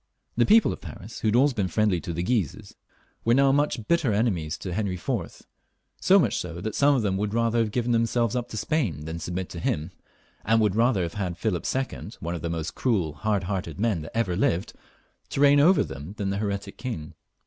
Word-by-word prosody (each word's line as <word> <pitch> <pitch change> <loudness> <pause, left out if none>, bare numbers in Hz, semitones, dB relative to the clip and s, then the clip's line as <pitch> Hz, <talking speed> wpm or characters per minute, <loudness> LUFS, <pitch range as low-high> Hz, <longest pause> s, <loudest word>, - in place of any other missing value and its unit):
The 120 - +3
people 220 +1 +5
of - - -10
Paris, 105 +5 -9
who - - -1
had 105 - +2
always 135 +3 +4
been 100 -5 -1
Mendly 100 -2 +1
to 85 - -5
the 85 +1 -2
Guises, 100 - -1 0.5
were 115 +1 +4
now 135 0 +4
such 145 -6 0
bitter 165 -8 +2
enemies 95 -7 0
to 90 - -5
Henry 100 -1 -1
IV., 85 - -4 0.6
that 90 +5 +2
some 145 0 +4
of 125 - +1
them 95 -2 0
would 105 +1 -1
sooner 115 0 +2
have 115 -2 +2
given 120 +2 -1
themselves 115 0 +1
up 120 -1 -2
to 110 - -6
Spain 105 - -1
than 80 +1 -5
submit 90 +2 -4
to 85 - -7
him, 80 +1 -2 0.5
and 115 0 +3
would 105 -3 +2
rather 115 -4 +3
have 85 - -4
had 90 -4 -3
Philip 90 -2 -1
II., 135 0 -3
one 85 +1 -4
of 85 - -5
the 85 - -3
most 80 -1 -3
cruel 105 -11 0
and 75 - -11
hard 100 +4 0
hearted 90 -3 -4
men 105 -6 +1
that 80 +8 -7
ever 100 -6 +1
lived, 90 -1 0 0.6
to - - -3
reign 145 0 +6
over 175 +6 +5
them, 70 +8 -8
than 100 -1 -1
the 100 - -2
heretic 100 -1 -3
king. 85 -12 -5
105 Hz, 215 wpm, -26 LUFS, 85-120 Hz, 0.6 s, reign